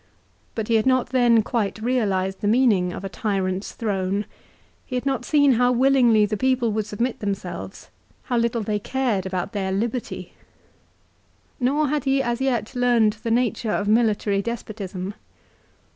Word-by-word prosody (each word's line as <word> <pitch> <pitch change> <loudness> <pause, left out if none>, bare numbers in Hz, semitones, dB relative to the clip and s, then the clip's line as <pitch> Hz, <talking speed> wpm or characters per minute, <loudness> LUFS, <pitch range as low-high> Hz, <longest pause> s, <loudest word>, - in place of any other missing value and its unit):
But 220 -2 -3
he 230 - +3
had 220 - 0
not 255 -1 +2
then 240 -3 +4
quite 220 -3 -2
realised 200 -6 0
the 205 - 0
meaning 210 -6 +3
of 175 - -7
a - - -3
tyrant's 195 -1 -2
throne. 200 -2 -1 0.6
He 255 - -6
had 250 - -2
not 265 -3 -1
seen 285 -2 +4
how 245 0 +3
willingly 245 -4 +4
the 210 +1 -2
people 255 -1 +1
would 215 0 -2
submit 235 +4 -2
themselves, 200 -2 -5 0.3
how 245 - -1
little 235 -1 0
they 210 0 -1
cared 225 -5 -1
about 185 -2 -3
their 195 -3 -2
liberty, 230 +5 -3 1.3
nor 280 +4 +1
had 295 -2 -1
he 270 0 +2
as 240 +1 -2
yet 245 -4 -1
learned 240 -4 +2
the 230 - -3
nature 235 -1 0
of 205 - -1
military 215 -2 +2
despotism. 200 -4 -5
225 Hz, 160 wpm, -23 LUFS, 205-250 Hz, 1.3 s, then